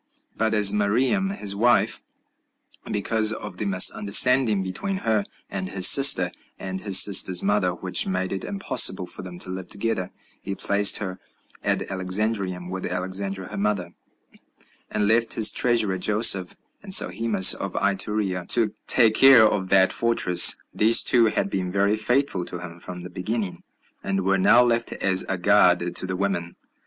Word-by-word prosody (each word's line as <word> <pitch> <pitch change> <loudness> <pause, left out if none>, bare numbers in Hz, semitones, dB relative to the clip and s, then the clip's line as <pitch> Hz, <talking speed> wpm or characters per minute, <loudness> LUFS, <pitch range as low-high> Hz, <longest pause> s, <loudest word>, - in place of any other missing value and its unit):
But 110 0 -2
as 105 -2 +4
to - - -5
Mariamne 130 - -1
his 100 - -6
wife, 120 +4 0 0.9
because 110 +1 -1
of - - -7
the 105 - -4
misunderstanding 105 +3 +3
between 190 - -5
her 110 -2 0 0.2
and 95 -2 -6
his 95 0 +4
sister, 95 -11 +5 0.3
and 95 0 -7
his 100 -3 +4
sister's 95 -3 +2
mother, 95 -3 -1
which 90 +1 -1
made 95 0 -4
it 95 - -5
impossible 190 - +1
for - - -9
them 90 -1 -11
to 90 - -2
live 95 -1 -8
together, 100 -3 -4 0.3
he 100 - -6
placed 100 +1 +3
her 95 -3 -7 0.4
at - - -1
Alexandrium, 95 -1 -3
with 95 0 -6
Alexandra 95 +1 -6
her - - -7
mother, 100 -3 -3 1.0
and 105 -1 -2
left 115 +2 +1
his 110 -1 +5
treasurer 110 -6 0
Joseph 100 -3 +2 0.3
and 200 - -12
Sohemus 110 -5 +3
of - - -7
Iturea 100 -2 -3
to 115 -3 +1
take 115 -3 +3
care 130 -1 +5
of 95 -3 -4
that 95 -1 +2
fortress. 105 -7 +3 0.2
These 110 +2 +4
two 120 -2 +2
had 100 - -2
been 90 -2 -4
very 100 +2 0
faithful 120 -3 -1
to 90 - -9
him 85 -1 -11
from 90 +1 -10
the 90 - -11
beginning, 105 0 -6 0.4
and 95 -1 -3
were 95 0 0
now 120 +6 +4
left 120 -1 -2
as 95 -1 0
a 95 - -2
guard 90 -2 +1
to 95 - +1
the 95 - -5
women. 90 -3 -4
100 Hz, 165 wpm, -22 LUFS, 95-110 Hz, 1.0 s, sister